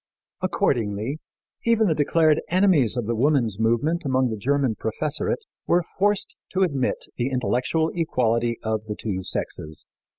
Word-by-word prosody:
Accordingly, 115 +4 0 0.4
even 230 -1 +3
the 170 - +3
declared 155 +1 +3
enemies 175 - +4
of 120 - -1
the 115 - -1
woman's 120 -4 +1
movement 120 +10 +1
among 130 -3 +1
the - - -2
German 135 +2 +1
professorate 150 - -2 0.2
were 175 +1 +3 0.2
forced 205 +1 +1 0.2
to 190 0 +3
admit 140 -8 0
the 120 +2 0
intellectual 130 +5 0
equality 120 -8 0
of 110 -1 -1
the 105 - -3
two 100 -4 -3
sexes. 80 -4 -4
130 Hz, 140 wpm, -24 LUFS, 115-160 Hz, 0.4 s, enemies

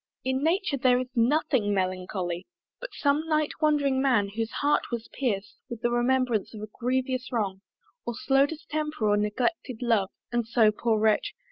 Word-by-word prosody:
In 260 +1 0
nature 345 -2 +1
there 250 -1 +4
is 255 0 -3
nothing 240 -4 +2
melancholy. 185 -1 -2 0.3
But - - -6
some 290 +2 0
night 305 -1 +1
wandering 285 -3 +2
Man, 240 -7 +2
whose 225 +2 -3
heart 290 +4 0
was 235 -1 -4
pierc'd 205 -7 -2 0.2
With 235 -1 -7
the 240 - +2
remembrance 240 -3 +1
of 210 - -8
a 215 - -7
grievous 255 +1 -1
wrong, 200 -5 -2 0.4
Or 240 - -4
slow 270 +3 +3
distemper 305 -5 -3
or 205 - +4
neglected 235 +4 -1
love, 220 -5 +2 0.2
(And 240 -2 0
so, 225 -2 +4
poor 220 +1 0
Wretch! 220 - +1
245 Hz, 165 wpm, -27 LUFS, 215-280 Hz, 0.4 s, there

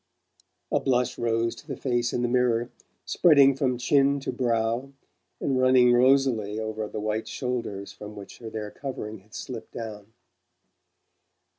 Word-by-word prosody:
A - - +3
blush 125 -2 0
rose 115 0 +1
to 150 - -14
the 135 -4 -5
face 120 -2 0
in 120 - -1
the - - +2
mirror, 120 -1 +1 0.3
spreading 140 -5 +5
from 130 -2 0
chin 140 +3 +3
to - - -3
brow, 120 +1 -1 0.5
and 135 -2 0
running 130 -1 +5
rosily 120 -5 +3
over 110 -1 -3
the 105 - -5
white 110 +1 -2
shoulders 115 -6 -4
from 105 0 -10
which 100 -2 -11
their 110 -2 -6
covering 110 -6 -6
had 105 +3 -17
slipped 120 -4 -7
down. 110 -2 -7
120 Hz, 145 wpm, -26 LUFS, 110-130 Hz, 0.5 s, spreading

